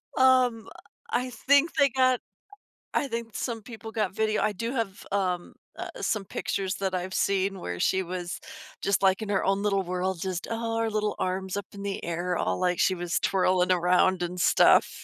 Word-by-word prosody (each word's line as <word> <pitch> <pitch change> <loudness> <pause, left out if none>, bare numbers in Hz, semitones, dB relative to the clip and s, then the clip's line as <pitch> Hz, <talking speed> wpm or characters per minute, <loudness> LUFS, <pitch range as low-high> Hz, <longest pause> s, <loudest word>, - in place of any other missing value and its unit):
Um, 255 -3 +4 0.4
I 250 +1 0
think 285 +6 +3
they 280 -2 +5
got 255 -1 +3 0.7
I 280 - +1
think 230 -2 -4
some 230 -3 -3
people 225 0 -9
got 215 -5 -1
video, 215 +1 +1
I 215 - +2
do 230 +5 -4
have, 225 -6 -3
um, 180 -3 -1 0.3
uh, - - -4
some 210 -3 -1
pictures 190 0 -2
that 190 -1 -2
I've 185 +1 -3
seen 195 0 +1
where 90 0 -4
she 190 0 +2
was 180 0 -5 0.4
just, 200 -1 +1
like, 190 +2 +3
in 210 - -4
her 195 - +1
own 195 +1 +1
little 195 -2 +2
world, 185 0 -2
just 185 0 -3
Oh, 230 0 -2
her 225 0 +1
little 215 -1 -1
arms 185 0 -2
up 200 -1 -3
in 200 0 -9
the 200 -1 -4
air, 175 +1 -2
all 90 0 -1
like 180 -1 +1
she 190 - +4
was 175 -1 -2
twirling 185 -1 +2
around 180 +1 +3
and 180 +1 -4
stuff, - - +4
195 Hz, 190 wpm, -27 LUFS, 185-225 Hz, 0.7 s, they